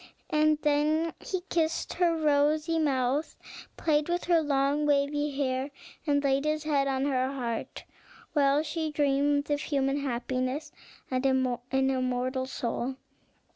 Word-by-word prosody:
And 305 0 +3
then 305 +2 +2
he 375 -2 -3
kissed 330 -3 -1
her 340 -2 +2
rosy 305 +2 +2
mouth, 275 0 0 0.4
played 300 0 +1
with 350 0 0
her 340 -2 +4
long 285 0 +1
waving 290 0 +1
hair, 265 0 -1 0.4
and 285 -1 +2
laid 275 0 +2
his 305 0 0
head 285 -3 +1
on 270 0 0
her 260 -2 0
heart, 240 -4 -4 0.5
while 285 0 +3
she 315 0 -2
dreamed 285 0 +1
of 290 0 +1
human 275 -2 0
happiness 260 +3 -2 0.4
and 255 0 0
an 260 -2 +1 0.3
immortal 255 0 -1
soul. 250 0 -3
285 Hz, 135 wpm, -28 LUFS, 265-305 Hz, 0.5 s, her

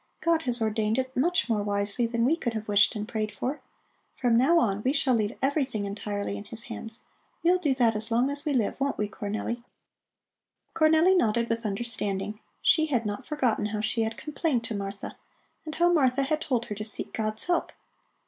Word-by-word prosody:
God 335 -1 +2
has 240 -1 +3
ordained 220 0 0
it 260 0 -2
much 335 +2 +2
more 220 -3 +1
wisely 205 +3 0
than 230 0 0
we 300 +6 +4
could 235 -8 -3
have 220 0 -4
wished 205 +2 +4
and 210 0 -4
prayed 215 -2 -2
for. 250 +8 -4 0.6
From 240 -3 +3
now 270 +9 +5
on, 205 -9 +1
we 260 +5 +1
shall 280 -3 +2
leave 215 -1 0
everything 270 -7 0
entirely 200 0 -3
in 205 - -8
His 225 +2 -5
hands. 225 0 -7 0.4
We'll 360 +2 +4
do 295 -7 +1
that 235 -3 +3
as 215 +2 +1
long 240 +4 +2
as 285 0 -2
we 305 - -1
live, 250 0 0
won't 280 +1 0
we, 210 - 0
Cornelli?" 215 +4 -4 1.1
Cornelli 320 +4 +5
nodded 235 -7 +2
with 230 -1 -1
understanding; 210 -1 -3 0.2
she 315 -1 +4
had 245 -6 0
not 210 +5 -4
forgotten 250 -8 0
how 210 0 -3
she 225 +2 0
had 225 0 -2
complained 300 -4 -1
to 230 -2 -4
Martha, 200 0 -6 0.5
and 310 0 -6
how 345 +1 +3
Martha 275 -4 +3
had 305 +3 0
told 245 -6 -1
her - - -5
to 210 +1 -5
seek 215 -1 0
God's 215 -1 -2
help. 355 -1 0
235 Hz, 200 wpm, -27 LUFS, 215-275 Hz, 1.1 s, now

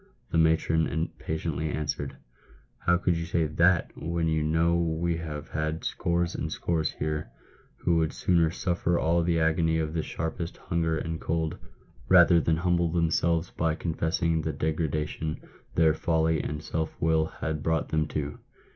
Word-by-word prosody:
The 85 - +2
matron 80 0 +3
impatiently 80 -1 -3
answered, 75 -2 -3 0.3
" - - -28
How 85 0 +5
can 90 0 +1
you 85 0 -2
say 85 -1 0
that, 85 +3 +3
when 85 0 -1
you 80 -1 +1
know 80 +2 +2
we 85 0 0
have 75 -2 -6
had 80 +1 -2
scores 85 0 0
and - - -3
scores 80 -2 -1
here, 75 0 -3 0.5
who 85 -1 +1
would 80 -1 +1
sooner 85 -3 +2
suffer 85 0 0
all 85 +1 +2
the 85 0 +1
agony 80 0 +2
of 80 -1 -1
the 80 - 0
sharpest 85 +2 -4
hunger 80 -2 -1
and 80 0 -4
cold, 80 -1 -1 0.5
rather 85 -2 +7
than 80 0 +1
humble 85 -1 +1
themselves 85 0 +1
by 80 -1 0
confessing 80 0 0
the 80 0 -2
degradation 75 +1 -2 0.4
their 80 -2 +5
folly 80 0 +1
and 75 +1 -4
self 80 -1 -3
will 80 0 +2
had 75 -1 -4
brought 80 0 0
them 80 0 +1
to 75 -1 -4
80 Hz, 160 wpm, -27 LUFS, 80-85 Hz, 0.5 s, rather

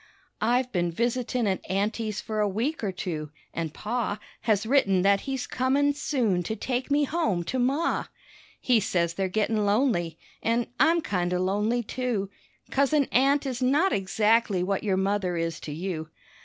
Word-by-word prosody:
I've 245 +3 +2
been 175 -2 0
visitin' 240 +4 -1
at 190 -2 0
aunty's 210 +2 -1
for 215 -1 -4
a 210 -1 +2
week 235 +9 -2
or 200 - 0
two, 165 -5 -4 0.2
an' 165 -1 -2
Pa 215 +5 -2 0.2
Has 215 -2 +1
written 205 -8 +3
that 200 0 +4
he's 265 -2 -2
comin' 275 +3 +1
soon 250 - 0
to 220 +6 -3
take 250 +4 -2
me 290 +1 +3
home 285 - 0
to 260 +9 -2
Ma. 275 +7 +1 0.5
He 245 -3 +3
says 170 -4 0
they're 190 +1 -1
gettin' 215 +2 +1
lonely, 200 - +1 0.2
an' 230 +1 +1
I'm 330 +5 +4
kind 180 - -1
o' - - +2
lonely, 210 +6 +1
too, 220 -4 -2 0.4
Coz 275 +2 +2
an 290 -3 +3
aunt 275 +3 +3
is 260 -2 -3
not 290 +9 +3
exactly 210 0 +2
what 195 +1 -1
your 195 -3 +1
mother 190 -2 0
is 165 -1 -2
to 150 - -7
you. 160 0 -4
215 Hz, 170 wpm, -27 LUFS, 190-255 Hz, 0.5 s, that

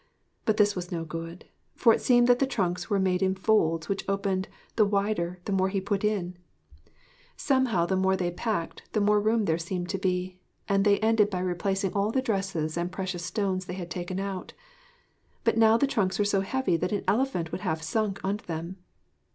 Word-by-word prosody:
But 215 -1 +2
this 205 -1 +4
was 180 -1 -5
no 165 -2 -3
good: 165 +2 -7 0.3
for 230 -3 +5
it - - -1
seemed 245 -1 +5
that 245 0 +4
the 270 - +2
trunks 180 -7 -2
were 205 - +2
made 185 -1 +1
in 190 0 +2
folds 165 -6 +2
which 200 - -2
opened 195 -1 0 0.3
the 220 - +5
wider 200 -3 0
the - - -3
more 190 -1 +2
he 195 0 -1
put 195 +1 -2
in. 185 -4 -1 1.0
Somehow 255 -10 +2
the 190 - 0
more 190 0 +2
they 175 -2 -1
packed, 190 -2 -3
the 215 - +2
more 210 0 +3
room 220 0 +2
there 160 -1 +1
seemed 175 +1 -4
to 195 - -2
be, 185 0 -2 0.3
and 195 0 +2
they 200 -1 +5
ended 220 -1 +3
by 190 - -3
replacing 190 +1 -1
all 200 +1 +1
the 260 - +1
dresses 195 -9 -1
and 175 +1 -2
precious 185 -2 -4
stones 190 -1 -1
they 180 - -5
had 175 -2 -7
taken 180 +1 -4
out. 195 -2 -5 0.9
But - - +2
now 225 0 +6
the 280 - +3
trunks 200 -8 0
were 205 - +2
so 200 -1 +2
heavy 195 -3 0
that 180 +2 -2
an 205 - -1
elephant 210 -9 0
would - - -4
have 160 -1 -2
sunk 210 +3 -1
under 200 +3 -2
them. 170 +3 -5
190 Hz, 205 wpm, -27 LUFS, 180-210 Hz, 1.0 s, now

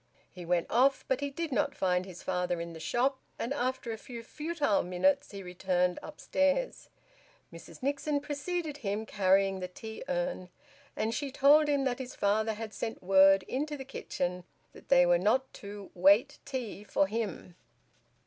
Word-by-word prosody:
He 180 -2 -9
went 175 -1 +2
off, 265 +4 +3
but 265 -1 +1
he 285 0 -2
did 320 +3 -4
not 275 +2 0
find 180 0 0
his 180 -3 -10
father 180 -1 -1
in 170 0 -5
the 160 - -9
shop, 260 - 0 0.2
and 245 - -2
after 255 -3 -2
a 220 - -5
few 235 -1 -9
futile 295 -4 0
minutes 275 +11 +1
he 200 -1 -8
returned 180 0 0
upstairs. 295 - -1 0.6
Mrs - - -12
Nixon 285 +1 0
preceded 300 +2 -3
him, 210 -3 -3
carrying 195 -1 +2
the 180 - -4
tea 220 +4 -8
urn, 260 -9 -2 0.5
and 225 +1 -1
she 280 +1 -3
told 290 +3 +5
him 285 -2 +2
that 255 -1 -1
his 255 -1 -7
father 215 +2 +1
had 215 -1 -7
sent 225 +1 -5
word 195 +1 +6
into 295 +8 -3
the 265 - -7
kitchen 180 -9 -3 0.3
that - - -16
they 180 - +6
were 175 0 +4
not 255 +8 +1
to 200 -1 -9
`wait 200 +11 +4
tea' 245 -7 -5
for 200 -1 +2
him. 200 -4 -4
225 Hz, 170 wpm, -30 LUFS, 190-275 Hz, 0.6 s, word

